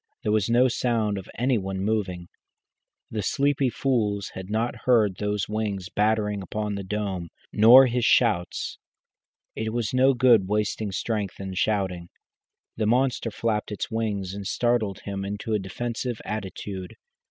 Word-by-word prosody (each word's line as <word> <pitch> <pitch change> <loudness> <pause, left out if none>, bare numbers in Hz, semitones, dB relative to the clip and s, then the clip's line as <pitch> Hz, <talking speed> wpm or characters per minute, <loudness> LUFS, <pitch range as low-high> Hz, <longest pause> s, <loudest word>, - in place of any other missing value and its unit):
There 105 - 0
was 105 -1 +1
no 120 +2 +5
sound 115 -5 0
of 95 - -11
any 125 -1 +2
one 95 0 -4
moving. 95 -4 -2 0.8
The 110 - -2
sleepy 140 +5 +1
fools 110 -6 -1
had 95 0 -7
not 115 +3 -2
heard 110 -7 +4
those 105 -1 -1
wings 105 -4 -3
battering 105 -1 +1
upon 105 +3 -3
the 100 - -3
dome, 95 -3 -3 0.2
nor 120 +5 +9
his 125 -1 0
shouts. 100 -7 +2 0.8
It 110 0 -3
was 120 -1 -1
no 130 +1 +4
good 120 -6 +5
wasting 105 0 -1
strength 105 -2 -3
in 95 -1 -5
shouting. 95 -3 -1 0.7
The 110 -1 0
monster 125 0 +1
flapped 110 -1 -2
its 105 - -4
wings 105 -4 -2
and 100 -1 -5
startled 120 -5 0
him 100 -1 -4
into 105 +3 -4
a 105 - +2
defensive 120 +4 -4
attitude. 95 -2 -5
105 Hz, 150 wpm, -25 LUFS, 100-115 Hz, 0.8 s, nor